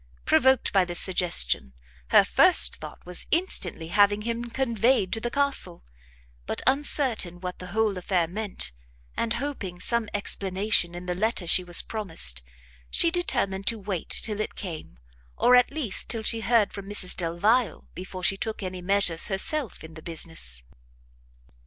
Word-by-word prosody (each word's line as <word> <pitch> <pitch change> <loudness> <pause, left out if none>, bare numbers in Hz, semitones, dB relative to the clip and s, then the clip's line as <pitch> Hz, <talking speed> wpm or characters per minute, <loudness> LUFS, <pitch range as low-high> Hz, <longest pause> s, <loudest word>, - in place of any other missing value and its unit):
Provoked 265 -1 +3
by 195 -2 +4
this 175 -1 -1
suggestion, 165 - +2 0.3
her - - +6
first - - +4
thought - - -11
was 180 0 -5
instantly 185 - 0
having 205 +2 +2
him 235 +1 -3
conveyed 235 -3 0
to 225 - 0
the 240 - -3
castle; 280 - -1 0.6
but - - -2
uncertain 260 - +1
what 180 0 -7
the 180 - -8
whole 215 +1 0
affair 180 -2 0
meant, 205 - -3 0.4
and 230 0 -1
hoping 235 -9 -5
some 235 +2 +1
explanation 195 -2 +1
in 175 +1 -8
the 180 - -2
letter 210 0 -1
she 180 +2 +3
was 175 -1 +2
promised, 160 - -2 0.5
she 335 - +3
determined 220 - -2
to 230 - +3
wait 195 -4 -5
till 210 -1 0
it 215 - -4
came, 165 - -8 0.4
or 250 - +5
at 250 0 +4
least 280 -9 -1
till 225 -2 -1
she 230 +1 +4
heard 225 -2 +1
from 200 -1 -8
Mrs 205 -3 +3
Delvile, 185 +5 0
before 185 0 -8
she 195 +2 +2
took 220 0 -4
any 185 -1 -6
measures 185 -3 +1
herself 220 - -2
in 160 0 -11
the 160 - -11
business. 155 - -3
200 Hz, 160 wpm, -25 LUFS, 175-230 Hz, 0.6 s, her